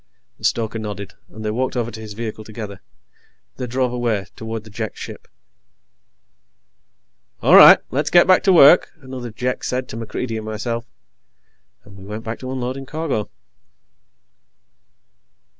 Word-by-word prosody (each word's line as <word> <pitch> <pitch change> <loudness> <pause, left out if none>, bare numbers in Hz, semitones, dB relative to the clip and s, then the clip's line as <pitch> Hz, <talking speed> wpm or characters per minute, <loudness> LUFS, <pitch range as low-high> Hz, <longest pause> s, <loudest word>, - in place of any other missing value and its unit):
The - - -6
stoker 115 -1 0
nodded, 100 -2 -6 0.2
and 110 0 -9
they 105 - 0
walked 125 +3 -2
over 120 -1 -1
to 110 - -9
his 110 -1 -8
vehicle 110 -1 -5
together. 105 -3 -8 0.8
They 125 - -4
drove 125 0 -1
away, 115 -5 -1
toward 110 -1 -6
the 110 - -14
Jek 110 -1 -5
ship. - - -9 2.2
"All - - +6
right, - - +11
let's 145 +3 0
get 175 - +6
back 185 0 +5
to 195 - +5
work," 165 -1 +7
another 130 -2 -7
Jek 125 +3 -3
said 130 0 -2
to 110 - -7
MacReidie 115 +1 -4
and 110 - -6
myself, 115 +2 -4 1.0
and 100 -1 -16
we 95 - -13
went 105 +3 -7
back 115 0 -5
to 130 0 -6
unloading 130 +1 -4
cargo. 150 -9 -3
115 Hz, 150 wpm, -20 LUFS, 110-130 Hz, 2.2 s, right